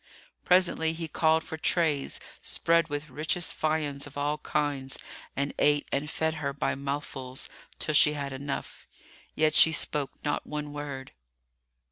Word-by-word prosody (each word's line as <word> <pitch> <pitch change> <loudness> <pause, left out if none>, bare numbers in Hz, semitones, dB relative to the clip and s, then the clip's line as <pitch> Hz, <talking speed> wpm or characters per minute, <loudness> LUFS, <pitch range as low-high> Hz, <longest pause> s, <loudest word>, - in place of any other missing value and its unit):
Presently 180 -3 +4
he 165 0 -4
called 160 +1 +3
for 160 - -6
trays 160 -3 +1 0.2
spread 165 -1 +3
with 145 -1 -4
richest 160 +4 0
viands 150 -3 0
of 145 - -11
all 145 +1 0
kinds 145 -3 -1 0.4
and 140 +1 -1
ate 145 0 +4
and 145 +2 0
fed 160 0 0
her 140 -1 -1
by 140 - 0
mouthfuls, 135 -2 -3 0.3
till 155 - -1
she 150 0 +6
had 140 -2 -3
enough; 140 +1 -5 0.5
yet 155 0 +3
she 160 - +7
spoke 150 -2 +1
not 145 - -1
one 150 -1 -4
word. 140 -3 -6
145 Hz, 145 wpm, -29 LUFS, 140-160 Hz, 0.5 s, she